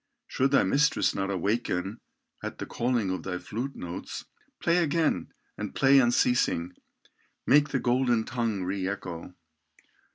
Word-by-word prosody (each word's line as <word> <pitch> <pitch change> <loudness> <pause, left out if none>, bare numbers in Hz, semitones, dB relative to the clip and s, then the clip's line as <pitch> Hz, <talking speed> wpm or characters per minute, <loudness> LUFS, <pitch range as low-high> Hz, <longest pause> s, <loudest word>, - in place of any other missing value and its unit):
Should 135 +1 +1
thy 140 - +4
mistress 140 +10 +2
not 95 0 -2
awaken 100 +1 -1 0.4
At - - -5
the - - -5
calling 120 -5 0
of 95 - -3
thy 90 -2 -3
flute 120 +9 -5
notes, 85 0 -6 0.3
Play 170 +1 +2
again, 165 -2 +1 0.3
and 105 -1 -5
play 135 0 +6
unceasing, 120 -8 +2 0.7
Make 145 +2 +5
the - - 0
golden 120 -2 +2
tongue 115 -5 -2
re 95 +1 -2
echo." 90 -3 -6
115 Hz, 135 wpm, -28 LUFS, 95-135 Hz, 0.7 s, play